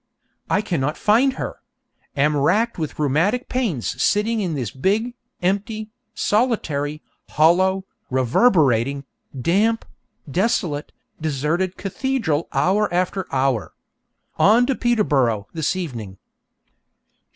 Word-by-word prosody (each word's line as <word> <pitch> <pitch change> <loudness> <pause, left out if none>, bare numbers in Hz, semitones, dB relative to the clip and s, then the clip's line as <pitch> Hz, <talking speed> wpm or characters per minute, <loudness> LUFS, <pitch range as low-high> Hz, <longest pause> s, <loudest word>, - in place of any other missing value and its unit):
I - - +2
cannot 150 -6 -2
find 245 +6 +3
her! - - -5 0.6
Am 150 +2 +3
racked 200 +11 +1
with 155 -2 -4
rheumatic 165 - +1
pains 215 - -2
sitting 220 +2 +2
in 175 -5 -2
this 125 -7 -3
big, 210 - 0 0.3
empty, 215 +3 -1 0.2
solitary, 155 - 0 0.3
hollow, 185 +4 +3 0.2
reverberating, 135 - +2 0.3
damp, 210 - +1 0.4
desolate, 165 - -1 0.3
deserted 160 +5 -1
cathedral 195 - -1
hour 205 +3 +2
after 185 +1 -1
hour. 130 -4 0 0.6
On 225 +5 +5
to 270 - +1
Peterborough 145 - +1
this 160 +2 -1
evening. 115 - -5
175 Hz, 100 wpm, -21 LUFS, 145-215 Hz, 0.6 s, On